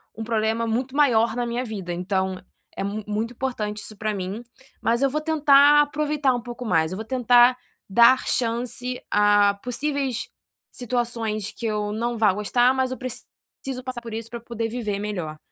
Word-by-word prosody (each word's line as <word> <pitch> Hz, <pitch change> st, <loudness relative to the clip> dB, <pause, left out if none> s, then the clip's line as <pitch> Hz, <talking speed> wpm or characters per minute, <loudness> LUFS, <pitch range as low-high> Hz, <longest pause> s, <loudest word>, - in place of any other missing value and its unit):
um 225 Hz, -, -5 dB
problema 225 Hz, 0 st, 0 dB
muito 255 Hz, +4 st, -2 dB
maior 235 Hz, -6 st, +3 dB
na 245 Hz, -1 st, -1 dB
minha 240 Hz, +2 st, -2 dB
vida, 195 Hz, -6 st, -5 dB
então, 190 Hz, +1 st, -1 dB, 0.4 s
é -, -, -3 dB
mu 205 Hz, +2 st, -3 dB
muito 220 Hz, +3 st, -2 dB
importante 215 Hz, -5 st, -3 dB
isso 215 Hz, -, -8 dB
para 215 Hz, +1 st, -2 dB
mim. 195 Hz, +4 st, -5 dB, 0.4 s
Mas 235 Hz, +3 st, +1 dB
eu 275 Hz, -, +3 dB
vou 305 Hz, +3 st, -2 dB
tentar 295 Hz, -2 st, +6 dB
aproveitar 295 Hz, -2 st, 0 dB
um 240 Hz, -, -3 dB
pouco 240 Hz, +1 st, -8 dB
mais, 160 Hz, -5 st, +1 dB
eu -, -, -3 dB
vou 220 Hz, -, -6 dB
tentar 245 Hz, 0 st, +4 dB, 0.3 s
dar 235 Hz, +5 st, +6 dB
chance 245 Hz, +1 st, -2 dB
a 205 Hz, -1 st, +4 dB
possíveis 265 Hz, -1 st, -2 dB, 0.4 s
situações 230 Hz, -4 st, -3 dB
que 235 Hz, -, -8 dB
eu 210 Hz, -1 st, -1 dB
não 235 Hz, +2 st, -2 dB
vá 215 Hz, -3 st, +4 dB
gostar, 240 Hz, +5 st, +2 dB
mas 260 Hz, -1 st, 0 dB
eu 255 Hz, -, -4 dB
preciso 255 Hz, 0 st, -8 dB
passar 255 Hz, -2 st, -5 dB
por 230 Hz, -2 st, -8 dB
isso 225 Hz, 0 st, -5 dB
para 235 Hz, -, -6 dB
eu -, -, -23 dB
poder 230 Hz, -1 st, -3 dB
viver 215 Hz, -4 st, -3 dB
melhor. 180 Hz, -7 st, -4 dB
235 Hz, 180 wpm, -24 LUFS, 210-255 Hz, 0.4 s, tentar